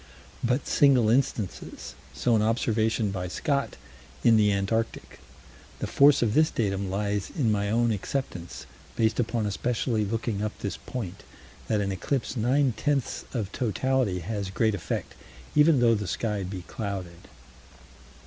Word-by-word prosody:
But 125 +3 +1
single 130 -6 +4
instances 120 -6 -2 0.2
so 120 -2 +1
an 110 - +3
observation 110 -1 +1
by 90 -1 -3
Scott, 140 +9 -1 0.5
in 115 -1 +6
the 105 -1 +4
Antarctic. 100 +3 -2 0.6
The - - -3
force 140 -2 +5
of 110 -3 +1
this 155 +3 +4
datum 100 -3 -1
lies 100 +1 -1
in 130 -10 0
my 100 -1 0
own 115 +2 +2
acceptance, 100 -5 -4 0.3
based 110 +1 +1
upon 115 -2 0
especially 110 +2 0
looking 110 0 -2
up 105 0 -3
this 100 - -4
point, 100 -8 -6 0.5
that 105 -2 +1
an 100 -1 -1
eclipse 130 +7 -2
nine 130 +3 +2
tenths 140 +3 -1
of 105 -6 -3
totality 125 -4 0
has 100 +2 -3
great 110 +3 +1
effect, 100 - -4 0.4
even 150 -1 +6
though 115 -1 +5
the 105 -3 -2
sky 105 +3 -2
be 95 -1 -5
clouded. 95 -4 -6
110 Hz, 145 wpm, -27 LUFS, 100-125 Hz, 0.6 s, in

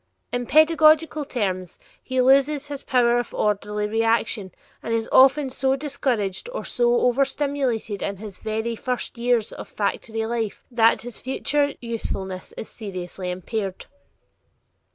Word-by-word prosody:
In 245 -1 -2
pedagogical 310 0 +5
terms, 185 -8 -3 0.2
he 260 -1 -2
loses 275 +3 +3
his 285 -1 -6
"power 240 -2 +3
of 240 - -5
orderly 210 0 0
reaction" 225 -2 0 0.3
and 230 - -1
is 225 0 -1
often 270 +1 +5
so 265 0 +1
discouraged 265 - -2
or - - -4
so 240 -1 +2
overstimulated 265 -4 0
in 200 -1 -3
his 205 -1 -8
very 220 +2 -2
first 250 +2 -3
years 235 -2 +1
of - - -8
factory 220 +2 -2
life 225 -3 -3
that 230 -2 +3
his 245 -1 -7
future 285 +2 0
usefulness 195 -5 -4
is - - -6
seriously 185 -3 -6
impaired. 190 +2 -4
235 Hz, 130 wpm, -23 LUFS, 210-270 Hz, 0.3 s, pedagogical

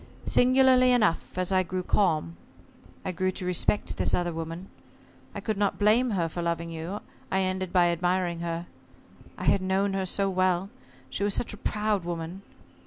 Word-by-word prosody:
Singularly 255 0 +5
enough, 215 -8 +1
as 185 +1 -1
I 190 -1 +4
grew 185 0 -3
calm, 160 - +1 0.7
I - - -1
grew 185 +1 0
to 185 - -4
respect 180 +3 0
this - - +1
other 175 -1 -1
woman. 165 +3 -6 0.7
I - - -4
could 215 -3 -2
not 205 -1 +1
blame 220 +5 +3
her 180 -6 0
for 175 +2 -5
loving 170 0 -2
you. 165 +6 -5 0.3
I 190 - +2
ended 185 -1 -2
by 175 -2 +4
admiring 175 0 0
her. 170 0 -3 0.7
I - - -6
had 195 - +3
known 190 +1 +1
her 190 -1 -1
so 195 +2 +1
well 185 0 +1 0.4
she 200 - -2
was 205 -1 +1
such 235 - -2
a - - -8
proud 210 -3 -1
woman! 170 +2 -5
185 Hz, 175 wpm, -27 LUFS, 170-200 Hz, 0.7 s, Singularly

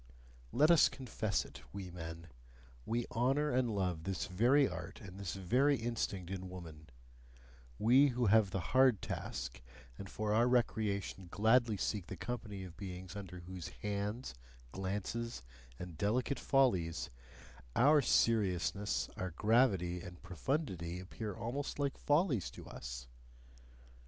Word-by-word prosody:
Let 150 +5 +5
us 170 - +7
confess 110 -6 -2
it, - - -12
we 95 -2 -6
men: 80 -1 -7 0.6
we 120 +1 0
honour 135 +6 +2
and 125 -1 +2
love 90 -6 -1
this 95 0 -2
very 125 +9 +4
art - - -6
and 95 -3 -10
this 95 -3 -4
very 125 +10 +3
instinct 110 -6 -3
in 95 -1 -5
woman: 80 -4 -10 0.9
we 130 - +6
who 125 -2 0
have 105 -1 +5
the 95 -1 -2
hard 130 -5 +5
task, - - -4 0.4
and 100 - -7
for 105 0 -1
our 115 +3 +4
recreation 105 -6 0
gladly 110 +2 +3
seek 95 -1 -2
the - - -6
company 105 -5 -5
of 90 -2 -9
beings 95 -1 -7
under 90 -3 -7
whose 90 -1 -7 0.2
hands, 105 - -2 0.4
glances, 100 - -3 0.3
and 90 -3 -8
delicate 120 +6 +1
follies, 95 - +2 0.6
our 145 +4 +6
seriousness, 100 - +2
our 95 - -2
gravity, 95 -3 +2
and 90 -1 -10
profundity 90 - -2
appear 100 +2 -6
almost 135 +6 -3
like 140 -1 0
follies 145 - +2
to - - -11
us. - - -7
100 Hz, 135 wpm, -35 LUFS, 90-120 Hz, 0.9 s, us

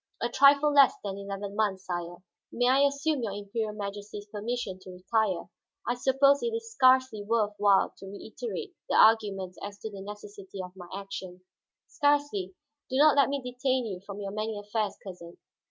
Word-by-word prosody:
"A 235 - -1
trifle 280 +3 +5
less 280 -1 +6
than 200 -1 -4
eleven 200 0 -6
months, 200 -3 0
sire. 175 0 -5 0.3
May 245 +1 +2
I 275 +2 +5
assume 280 0 -1
your 215 -4 -3
Imperial 210 +2 -3
Majesty's 205 0 -6
permission 210 -2 -4
to 185 - -13
retire? 185 +1 -1 0.4
I - - +2
suppose 270 +3 +3
it 465 -1 -1
is 455 0 -6
scarcely 260 - +4
worth 210 0 0
while 200 -1 +4
to 195 - -10
reiterate 385 - -6 0.2
the - - +1
arguments 200 -5 +3
as 200 0 -7
to 220 - -5
the 195 -1 -8
necessity 205 -1 -9
of 180 0 -7
my 180 -2 -10
action." 190 -2 -7 0.5
"Scarcely. 285 - 0 0.3
Do 260 - -1
not 300 +1 +6
let 280 -1 +4
me 280 -1 -2
detain 250 0 -1
you 190 -5 -5
from 200 0 -8
your 200 -1 -4
many 215 +1 -3
affairs, 210 +1 -2
cousin. 175 -3 -10
210 Hz, 175 wpm, -28 LUFS, 195-260 Hz, 0.5 s, less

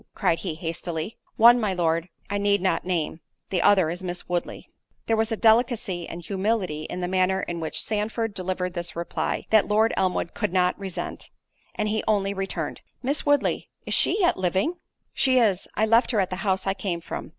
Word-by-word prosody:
cried 165 - +1
he 175 -5 -4
hastily. 165 +3 -4 0.2
"One, 240 +2 +7
my 205 -4 0
Lord, 165 0 0 0.2
I 205 0 -2
need 200 0 +2
not 185 -1 0
name—the 175 +1 -3
other 185 -5 +4
is 175 +2 -5
Miss 180 -1 -5
Woodley." 175 -1 -3 0.4
There 225 - +2
was 220 +1 0
a 225 - 0
delicacy 220 -6 +2
and 170 +1 -7
humility 190 -5 -1
in 180 - -5
the 180 - -1
manner 190 +1 +1
in 170 -1 -4
which 160 -1 -2
Sandford 220 +1 -2
delivered 185 -1 -2
this 175 -1 -3
reply, 170 0 -2
that 220 -2 +5
Lord 215 +2 +3
Elmwood 185 -2 0
could - - -2
not 180 0 +2
resent, 185 -3 -5 0.5
and 215 - -1
he 215 +1 0
only 200 -2 +1
returned, 190 -5 -4 0.2
"Miss 280 +3 0
Woodley—is 290 0 0
she - - +3
yet 355 -3 +3
living?" 190 - 0 0.4
"She 260 -1 +3
is—I 215 -1 +2
left 230 +2 +4
her 225 - +1
at 190 -2 0
the 185 - -3
house 190 -1 0
I 195 - +1
came 185 -3 -3
from." - - -6
190 Hz, 185 wpm, -25 LUFS, 175-220 Hz, 0.5 s, One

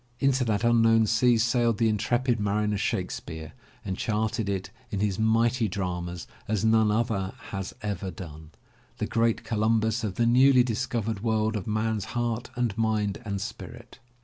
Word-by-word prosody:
into 135 -1 +2
that 110 -2 0
unknown 115 -1 +4
sea 115 +2 +3
sailed 120 -1 +2
the 115 - +2
intrepid 120 +3 +1
mariner 105 +1 0
Shakespeare 80 -5 -3 0.3
and 95 -2 -2
charted 110 0 -1
it 95 -1 -3 0.2
in 100 - -3
his 100 -1 0
mighty 115 +2 +2
dramas 90 -3 -4 0.2
as 110 -1 0
none 110 -1 +4
other 105 -3 0 0.2
has 95 -1 -5
ever 100 -2 -3
done, 80 -4 -9 0.5
the - - -1
great 115 0 +1
Columbus 110 +1 +1
of 100 -4 -3
the 120 - +2
newly 130 +2 +6
discovered 115 -3 -2
world 110 -1 +1
of 105 - -4
man's 110 -1 -1
heart 120 0 -1
and 120 -4 -1
mind 110 -2 0
and 100 -2 -3
spirit. 100 - -8
110 Hz, 155 wpm, -27 LUFS, 100-115 Hz, 0.5 s, newly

